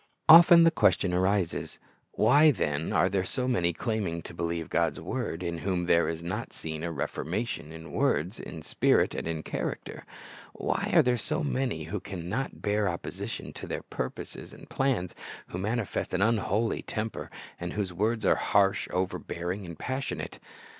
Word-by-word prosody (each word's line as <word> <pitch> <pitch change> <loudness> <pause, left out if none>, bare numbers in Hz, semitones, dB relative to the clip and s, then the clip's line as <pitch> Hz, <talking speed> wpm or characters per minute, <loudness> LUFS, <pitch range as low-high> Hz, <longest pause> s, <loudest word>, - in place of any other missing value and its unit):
Often 170 +1 +10
the 165 - +6
question 95 - +3
arises, 95 -1 0 0.4
Why, 145 +8 +6
then, 80 - 0
are - - +3
there 95 0 0
so 125 +6 -1
many, 90 -9 +2
claiming 95 -5 -2
to - - -9
believe 85 -1 -2
God's 80 -2 0
word, 85 +3 -3
in 85 -1 -3
whom 90 0 -1
there 85 0 +3
is 80 0 -4
not 95 +7 -4
seen 80 -1 -5
a 85 - -2
reformation 80 +3 -3
in 80 0 -10
words, 90 +8 0
in 80 -2 -8
spirit, - - +2
and - - -4
in 80 -1 -3
character? - - -4 0.5
Why - - -1
are - - +8
there 125 -1 +2
so 155 +5 -1
many 130 - -1
who 90 +7 -4
can 90 -3 -7
not 130 +9 -3
bear 105 -1 +1
opposition 85 - -5
to - - -8
their - - -4
purposes 65 - -6
and - - -13
plans, 130 -10 0 0.4
who 90 - -5
manifest 105 -1 -2
an 95 - 0
unholy 110 0 +1
temper, 110 0 -4 0.3
and 85 0 -4
whose 100 -4 -2
words 110 +4 0
are - - +6
harsh, 100 -1 +2
overbearing, 90 +1 -3
and 85 -2 -8
passionate? 130 - -4
95 Hz, 165 wpm, -28 LUFS, 85-115 Hz, 0.5 s, Often